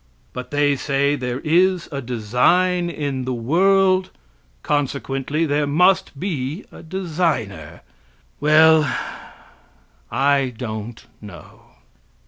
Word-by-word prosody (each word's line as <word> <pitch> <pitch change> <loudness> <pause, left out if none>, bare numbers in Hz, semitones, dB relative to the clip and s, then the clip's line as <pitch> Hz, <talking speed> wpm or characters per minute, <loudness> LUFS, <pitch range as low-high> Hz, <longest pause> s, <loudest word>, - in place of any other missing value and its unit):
But 125 - -7
they 145 0 +2
say 140 +1 0
there 125 -1 -4
is 180 +2 +2
a 140 -1 -4
design 125 - +1
in 140 -5 -3
the 130 -1 -2
world, 185 +8 +2 0.5
consequently 140 +1 -1
there 145 -1 0
must 165 -1 +2
be 155 -1 -4
a - - -12
designer. 160 - -3 0.6
Well, 155 +1 +5 1.3
I 135 -2 +1
don't 110 -1 -6 0.2
know. 90 -7 -13
145 Hz, 100 wpm, -21 LUFS, 125-170 Hz, 1.3 s, Well